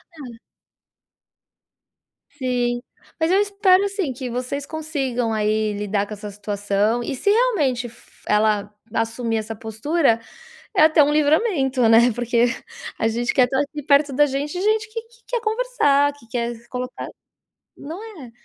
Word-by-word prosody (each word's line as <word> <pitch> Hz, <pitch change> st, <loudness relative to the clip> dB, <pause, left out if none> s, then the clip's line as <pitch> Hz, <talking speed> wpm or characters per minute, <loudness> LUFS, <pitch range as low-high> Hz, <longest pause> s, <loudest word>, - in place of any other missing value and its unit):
Ah. 250 Hz, -6 st, -10 dB, 1.9 s
Sim, 245 Hz, -3 st, -1 dB, 0.4 s
mas 320 Hz, +2 st, +2 dB
eu 390 Hz, -, +4 dB
espero, 400 Hz, -1 st, +3 dB
assim, 390 Hz, -7 st, -2 dB
que 255 Hz, 0 st, -6 dB
vocês 255 Hz, +4 st, -3 dB
consigam 270 Hz, -7 st, -2 dB
aí 215 Hz, 0 st, 0 dB
lidar 205 Hz, 0 st, -1 dB
com 210 Hz, -, -8 dB
essa 210 Hz, 0 st, -7 dB
situação 205 Hz, +2 st, -1 dB
e, 265 Hz, -, -3 dB
se 405 Hz, -, 0 dB
realmente 320 Hz, -, +2 dB
fo 230 Hz, -, -21 dB
ela 210 Hz, -1 st, +2 dB, 0.2 s
assumir 225 Hz, 0 st, -1 dB
essa 220 Hz, +1 st, -4 dB
postura, 230 Hz, +4 st, 0 dB, 0.6 s
é -, -, +6 dB
até 310 Hz, -1 st, +6 dB
um 295 Hz, +1 st, +2 dB
livramento, 290 Hz, -, +2 dB
né. 235 Hz, +1 st, +6 dB
Porque 240 Hz, 0 st, +1 dB, 0.5 s
a 225 Hz, -, +1 dB
gente 240 Hz, +2 st, -1 dB
quer 255 Hz, -, +5 dB
estar 265 Hz, +2 st, 0 dB
aqui 295 Hz, +1 st, -4 dB
perto 280 Hz, 0 st, +3 dB
da 295 Hz, +3 st, +4 dB
gente, 280 Hz, +2 st, -3 dB
gente 430 Hz, +1 st, +1 dB
que 455 Hz, -, -3 dB, 0.3 s
quer 485 Hz, -2 st, -1 dB
conversar, 435 Hz, -, +2 dB
que 285 Hz, -5 st, -19 dB
quer 235 Hz, 0 st, -2 dB
colocar 250 Hz, 0 st, -5 dB, 0.7 s
não 330 Hz, +8 st, -8 dB, 0.2 s
é? 235 Hz, -, -11 dB
255 Hz, 145 wpm, -22 LUFS, 225-310 Hz, 1.9 s, é